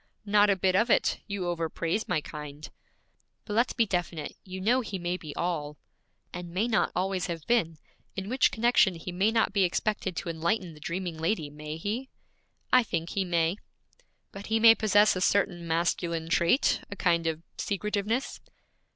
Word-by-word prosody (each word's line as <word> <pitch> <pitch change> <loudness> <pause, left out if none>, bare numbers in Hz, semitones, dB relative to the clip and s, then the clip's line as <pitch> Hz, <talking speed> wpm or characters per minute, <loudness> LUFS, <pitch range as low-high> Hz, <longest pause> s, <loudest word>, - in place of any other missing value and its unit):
'Not 205 0 +4
a 200 - +4
bit 185 0 +1
of 225 +5 +3
it; - - +2
you 200 -3 -3
overpraise 170 +3 -2
my 155 - 0
kind.' 150 0 -9 0.7
'But 210 - -5
let's 235 +3 +2
be 230 - +2
definite 175 -5 -3
you 190 0 -7
know 240 +7 +2
he 210 -4 -5
may 175 0 -2
be 155 -5 -8
all 150 -4 -2 0.3
' - - -46
'And 180 0 -6
may 190 +7 0
not 220 -3 +1
always 185 0 -1
have 165 -3 -5
been; 170 -10 +1 0.4
in 195 0 -4
which 255 +4 +3
connection 225 -4 +3
he 165 +2 -7
may 190 +4 +2
not 225 -3 +1
be 200 -2 +3
expected 190 +1 -1
to 170 - -4
enlighten 170 +2 -1
the 150 - -14
dreaming 170 +1 -4
lady, 160 -3 -1
may 150 +1 -7
he?' 220 +10 -3 0.6
'I 255 - +8
think 170 -7 -3
he 195 - 0
may.' 170 0 +1 0.7
'But 200 +1 -9
he 225 +1 +1
may 225 0 +9
possess 210 -2 +4
a 185 - -2
certain 180 -3 +1
masculine 165 0 -1
trait, 170 +10 +3
a 200 - -6
kind 170 -3 +1
of 160 0 -2 0.2
secretiveness.' 210 +4 -2
185 Hz, 180 wpm, -28 LUFS, 165-210 Hz, 0.7 s, may